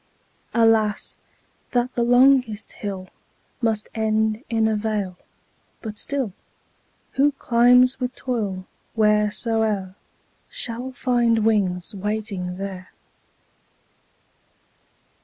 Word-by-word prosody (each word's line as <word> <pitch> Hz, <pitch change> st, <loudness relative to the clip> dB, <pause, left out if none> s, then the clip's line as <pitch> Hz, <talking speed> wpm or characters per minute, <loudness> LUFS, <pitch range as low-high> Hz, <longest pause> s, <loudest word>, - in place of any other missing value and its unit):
20 230 Hz, -1 st, +5 dB
Alas, 215 Hz, -2 st, +1 dB, 0.5 s
that 245 Hz, +1 st, +1 dB
the 240 Hz, -, -1 dB
longest 245 Hz, -2 st, +4 dB
hill 195 Hz, -3 st, -6 dB, 0.5 s
Must 220 Hz, -2 st, 0 dB
end 220 Hz, +1 st, 0 dB
in 225 Hz, -2 st, +2 dB
a 220 Hz, -, +1 dB
vale; 210 Hz, -3 st, -2 dB, 0.7 s
but 215 Hz, -2 st, -5 dB
still, 265 Hz, -8 st, -1 dB, 0.8 s
Who 285 Hz, +1 st, +3 dB
climbs 250 Hz, 0 st, +4 dB
with 250 Hz, 0 st, -3 dB
toil, 205 Hz, -7 st, -3 dB, 0.3 s
wheresoe'er, 210 Hz, -2 st, +1 dB, 0.6 s
Shall 245 Hz, +2 st, -4 dB
find 240 Hz, -3 st, +1 dB
wings 190 Hz, -5 st, +1 dB
waiting 200 Hz, -3 st, -3 dB
there. 190 Hz, -1 st, -6 dB
220 Hz, 90 wpm, -23 LUFS, 205-240 Hz, 0.8 s, 20